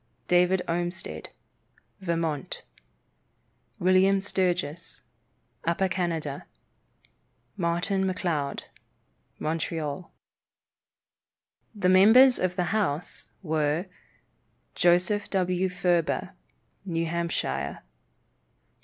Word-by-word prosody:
David 180 +1 +3
Olmsted, 175 +2 -3 0.7
Vermont. 165 -6 -2 1.1
William 185 +2 +4
Sturgis, 180 -4 -2 0.6
Upper 170 +3 +1
Canada. 165 -6 -3 1.1
Martin 180 +2 0
McLeod, 175 -7 -2 0.7
Montreal. 160 0 -3 1.6
The 185 -3 +1
members 225 +8 +7
of 185 -1 0
the 180 -1 -1
House 180 -7 -1 0.2
were: 155 +1 0 0.9
Joseph 180 +4 +2
W. 185 -1 0
Furber, 175 -2 0 0.5
New 165 -3 -1
Hampshire. 165 - -2
175 Hz, 65 wpm, -27 LUFS, 165-185 Hz, 1.6 s, members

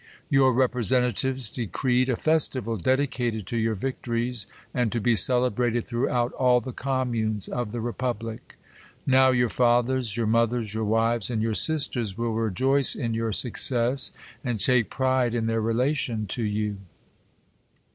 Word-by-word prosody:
Your 135 -2 +4
representatives 125 0 0
decreed 125 +2 -1
a 125 - +1
festival 130 -7 +1
dedicated 120 -1 -1
to 115 - -4
your 110 -1 -1
victories^ 120 -1 -2 0.3
and 120 -4 -1
to 120 - -2
be 115 +2 +1
celebrated 120 +1 +2
throughout 120 0 -1
all 125 -1 +2
the 130 +1 -8
com 130 -1 -2
munes 110 -3 -2
of 120 -4 -4
the 120 - -5
republic. 115 -1 -5 0.5
Now 130 0 +4
your 120 -1 +2
fathers, 120 -1 0
your 115 - -1
moth 115 +1 +1
ers, 115 -4 -4
your 110 0 -3
wives, 115 +1 0
and 115 -3 -2
your 115 -1 -1
sisters, 120 -7 +3
will 115 -1 -2
rejoice 130 +6 +2
in 115 -2 -3
your 115 0 -2
success, 125 +3 +4 0.3
and 120 -5 -3
take 120 +2 +3
pride 130 -2 0
in 115 -1 -1
their 115 0 -1
relation 115 0 -1
to 120 - -2
you. 105 -1 -2
120 Hz, 150 wpm, -24 LUFS, 115-130 Hz, 0.5 s, Your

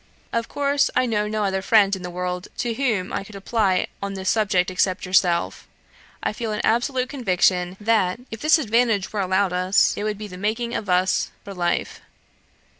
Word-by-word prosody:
Of 230 0 -1
course, 285 0 +1
I 255 - +3
know 210 -3 0
no 215 0 -1
other 190 -1 0
friend 200 -1 +4
in 190 - -9
the 180 - -5
world 180 +1 -4
to 240 -1 -1
whom 220 -7 -1
I - - -2
could 200 +1 -13
apply 195 -2 +1 0.2
on 200 0 -4
this 190 0 0
subject 195 -4 +1
except 185 +1 0
yourself. 175 - +1 0.6
I - - -1
feel 225 0 -4
an 210 - -2
absolute 250 +3 +1
conviction 185 -7 +1
that, 210 -2 +1
if 225 - -7
this 310 +2 +5
advantage 230 -7 +1
were 210 - 0
allowed 190 0 +1
us, 185 +2 +3
it - - -4
would 210 -1 -2
be 210 0 -7
the 180 -2 -10
making 225 +4 -2
of 205 - -4
us 180 +1 +2
for 200 - -8
life. 175 -2 -2
200 Hz, 190 wpm, -23 LUFS, 185-225 Hz, 0.6 s, this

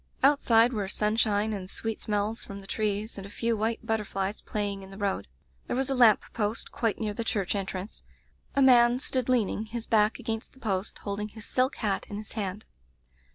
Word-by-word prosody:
Outside 250 -4 +5
were 205 -4 -1
sunshine 210 +1 +1
and 190 -2 -5
sweet 225 +1 -4
smells 210 +2 -1
from 200 0 -8
the 195 - -11
trees, 210 +1 -2
and 195 - -7
a - - -12
few 230 +2 0
white 220 +2 -1
butterflies 205 -2 -1
playing 205 -2 -3
in 190 - -11
the 195 - -10
road. 195 - -1 0.4
There - - -1
was 265 +1 0
a - - +3
lamp 240 -4 +6
post 215 0 -1
quite 225 -3 -1
near 215 -2 -1
the 230 - -3
church 200 -5 0
entrance. 195 0 -4 0.5
A 275 - +5
man 240 -2 +6
stood 255 -1 -1
leaning 220 -3 +1
his 230 +1 -5
back 215 -1 +3
against 225 -1 -4
the 260 - -19
post, 200 -5 -1
holding 205 +1 -3
his 215 0 -11
silk 255 +1 +1
hat 205 -4 -1
in 205 - -5
his 210 0 -7
hand. 205 -1 -3
215 Hz, 200 wpm, -28 LUFS, 200-230 Hz, 0.5 s, lamp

